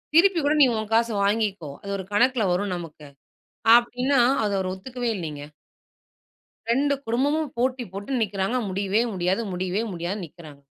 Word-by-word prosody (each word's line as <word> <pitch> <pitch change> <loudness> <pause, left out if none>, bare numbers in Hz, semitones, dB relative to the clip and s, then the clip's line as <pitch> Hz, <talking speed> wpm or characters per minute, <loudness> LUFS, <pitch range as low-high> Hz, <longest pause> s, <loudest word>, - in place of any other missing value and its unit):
திருப்பி 360 0 +5
கூட 295 - +3
நீ 270 - +8
உன் 215 0 -5
காச 230 +1 +3
வாங்கிக்கோ, 200 -7 0
அது 200 - -8
ஒரு 190 - -6
கணக்கில 240 0 +3
வரும் 195 0 -1
நமக்கு 155 -3 -10 0.7
அப்படின்னா, 250 +3 +1 0.2
அத 205 - 0
அவர் 185 -1 -2
ஒத்துக்கவே 245 +4 -4
இல்லைங்க. 150 -4 -6 1.3
2 280 +3 +2
குடும்பமும் 285 +6 0
போட்டி 255 0 0
போட்டு 205 +7 -3
நிக்றாங்க. 200 +3 -1
முடியவே 200 +4 0
முடியாது, 185 +4 0
முடியவே 185 +4 -1
முடியாது 175 +5 -3
நிக்றாங்க. 150 -3 -14
210 Hz, 145 wpm, -24 LUFS, 185-250 Hz, 1.3 s, நீ